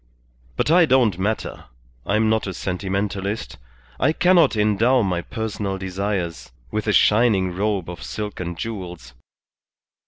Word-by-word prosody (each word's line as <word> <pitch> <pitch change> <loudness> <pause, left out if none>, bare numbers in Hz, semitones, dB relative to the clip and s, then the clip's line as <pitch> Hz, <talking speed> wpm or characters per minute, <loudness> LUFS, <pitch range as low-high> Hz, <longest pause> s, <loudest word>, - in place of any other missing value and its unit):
But - - +1
I 170 -1 +6
don't 120 -8 +3
matter, 105 +3 -2 0.4
I 100 - +1
am 110 +1 +3
not 110 -1 +1
a 95 - -4
sentimentalist, 100 +3 -3 0.4
I 155 +4 +3
cannot 175 -5 +4
endow 110 +4 +3
my 90 -3 -1
personal 105 0 -4
desires 95 -2 -3 0.2
with 110 0 -2
a - - +3
shining 105 -4 +3
robe 100 -2 -1
of 85 -1 -8
silk 105 +3 -5
and 85 -1 -4
jewels. 90 - -6
105 Hz, 135 wpm, -22 LUFS, 95-110 Hz, 0.4 s, I